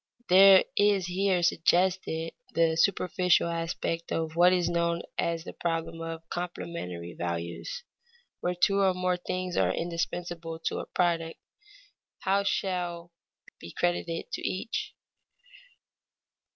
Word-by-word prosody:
There 190 +1 +8
is 205 -3 +3
here 185 0 +1
suggested 170 -1 +1 0.2
the 165 -1 +3
superficial 180 0 +2
aspect 165 0 -3
of 160 -1 -2
what 175 +1 +6
is 180 -2 +2
known 170 0 0 0.2
as 165 -1 0
the - - -8
problem 165 -1 -3
of 165 0 -6
complementary 165 - -5
values. 85 - -4 0.6
Where 180 0 -1
two 195 +3 +3
or 190 -2 +3
more 180 0 0
things 185 0 -3
are - - +3
indispensable 170 -1 -3
to - - -1
a - - -6
product, 165 -2 0 0.8
how 195 +1 +2
much 200 - -2
shall 175 -2 -2 0.5
be 85 - -9
credited 175 -1 -1
to - - -4
each? 190 +4 -3
175 Hz, 125 wpm, -28 LUFS, 165-185 Hz, 0.8 s, There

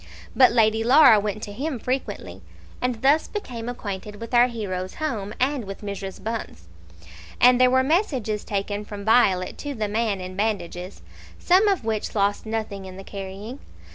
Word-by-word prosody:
But 255 -2 +6
Lady 220 -1 +3
Laura 255 -2 +7
went 210 0 -3
to 205 - -6
him 280 +4 -3
frequently, 215 - -4 0.4
and 250 -1 -2
thus 290 +4 +4
became 245 - -6
acquainted 210 -3 -6
with 230 +3 -9
our 240 0 +6
hero's 190 -6 -5
home 225 -10 -3
and 265 -2 0
with 195 0 -8
Mrs. 200 -1 -6
Bunce. 220 - -5 0.7
And 250 0 +6
there 255 - +6
were 260 +1 +3
messages 260 - 0
taken 205 0 -3
from 205 -1 -8
Violet 195 -5 +3
to 290 -1 -5
the 215 -2 -2
man 215 -1 -1
in 185 0 -7
bandages, 190 -3 -3 0.3
some 375 +4 +4
of 390 - +1
which 220 -1 -2
lost 205 +1 0
nothing 215 -3 -4
in 185 0 -9
the 195 - -8
carrying. 200 +6 -7
220 Hz, 170 wpm, -24 LUFS, 200-250 Hz, 0.7 s, Laura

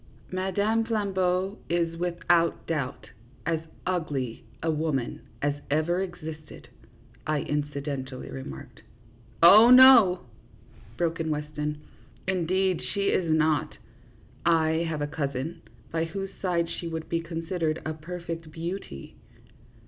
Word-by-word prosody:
" - - -26
Madame 200 +4 +1
Flambeau 195 -3 0
is, 170 -1 0
without 170 -1 +1
doubt, 140 -5 -3 0.4
as 165 -1 +1 0.3
ugly 145 -10 -2 0.2
a 165 - +2
woman 150 -5 -2 0.2
as 145 0 +2 0.2
ever 155 +5 +1
existed," 160 -5 -7 0.6
I 155 -2 +1
incidentally 140 -3 -4
remarked. 70 - -8 0.3
" 115 +2 -12
Oh, 215 +7 +10
no," 250 -8 +8 0.8
broke 165 0 0
in 160 -1 -1
Weston; 150 0 -3 0.2
" - - -27
indeed 185 +1 +1
she 200 -1 -1
is 170 -3 +1
not. 155 -1 +1 0.7
I 165 0 +2
have 155 -2 -2
a - - +1
cousin, 145 +1 -3 0.3
by 165 0 0
whose 195 +3 -5
side 175 -3 +1
she 170 - -6
would 160 -1 -5
be 165 0 -1
con 165 0 -5
sidered 165 -2 -1
a 155 - -2
perfect 165 0 -6
beauty." 165 - -6
165 Hz, 125 wpm, -27 LUFS, 150-180 Hz, 0.8 s, Oh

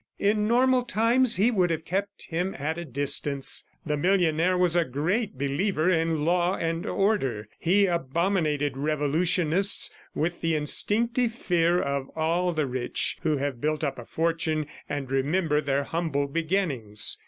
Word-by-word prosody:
In 210 +1 +1
normal 255 +2 +3
times, 240 0 +2
he 215 +6 +3
would 185 -6 +2
have 160 -1 -2
kept 200 +3 -3
him 175 +3 -3
at 160 +4 -3
a 170 - -5
distance. 140 0 0 0.2
The 150 -2 -1
millionaire 180 +1 +2
was 180 -2 +2
a 175 - +4
great 165 - -2
believer 155 +6 0
in 165 -3 0
law 175 +2 +2
and 165 0 -2
order. 135 - 0
He 200 +4 +3
abominated 160 -3 0
revolutionists, 160 +6 +1 0.2
with 170 +2 -2
the 165 -1 +1
instinctive 230 - +1
fear 175 -5 +1
of 140 -3 -2
all 170 +3 +1
the 155 -3 0
rich 125 -1 -2
who 155 -3 +1
have 135 -3 -3
built 155 +1 -1
up 140 -3 -2
a 120 - -9
fortune 160 -1 -1 0.2
and 145 -3 -4
remember 150 +3 +1
their 140 -1 0
humble 155 -2 -1
beginnings. 145 - 0
165 Hz, 150 wpm, -26 LUFS, 145-185 Hz, 0.2 s, a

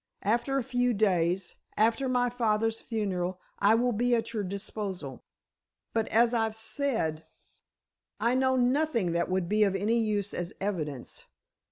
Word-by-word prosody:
After 240 +6 +1
a 270 - 0
few 245 -1 +1
days—after 200 +6 +1
my 245 -1 +2
father's 225 -2 0
funeral, 185 -5 -2 0.2
I 210 +2 +5
will 245 +2 +2
be 240 +2 +2
at 230 0 -2
your 215 - -1
disposal. 195 - -5 0.7
But 225 -1 0
as 235 +2 +3
I've 225 -2 0
said, 220 - -1 1.0
I 235 - +2
know 260 0 +2
nothing 250 - +2
that 170 0 0
would 185 -1 0
be 210 +3 +3
of 195 -2 +2
any 215 +5 +1
use 210 -3 -1
as 175 0 -4
evidence. 155 -10 -4
220 Hz, 145 wpm, -29 LUFS, 190-240 Hz, 1.0 s, I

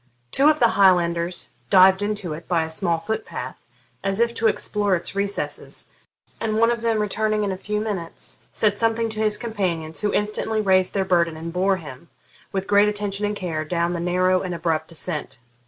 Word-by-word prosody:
Two 285 +3 +5
of 305 - +3
the 235 -4 +4
Highlanders 175 -2 +2 0.2
dived 190 0 +6
into 205 -5 -2
it 165 +2 -9
by 170 -3 +1
a 160 - -4
small 170 0 0
foot 220 +7 -3
path, - - -7 0.4
as 195 +1 -1
if 235 0 +2
to 225 -1 +1
explore 205 -2 +1
its 170 - -2
recesses, 200 0 -3 0.5
and 220 -1 -1
one 230 +1 +4
of 235 -1 -2
them 230 -2 +1
returning 215 0 0
in 200 - -1
a - - -2
few 210 +3 -3
minutes, 200 -6 -6
said 205 -1 +1
something 225 0 +1
to 215 - -6
his 215 -1 +3
companions, 180 -9 -2
who 210 -1 +1
instantly 215 +1 0
raised 190 -2 +2
their 195 -1 +1
burden 170 -3 +1
and 165 +1 -6
bore 190 +1 +2
him, 150 -1 -11 0.4
with 190 -1 -2
great 205 +1 +4
attention 205 0 -2
and 210 - -3
care, 165 -6 -3
down 170 +2 -1
the 170 - -3
narrow 185 +1 +2
and 180 -2 -4
abrupt 165 -1 -1
descent. 165 -3 -4
195 Hz, 195 wpm, -23 LUFS, 170-210 Hz, 0.5 s, dived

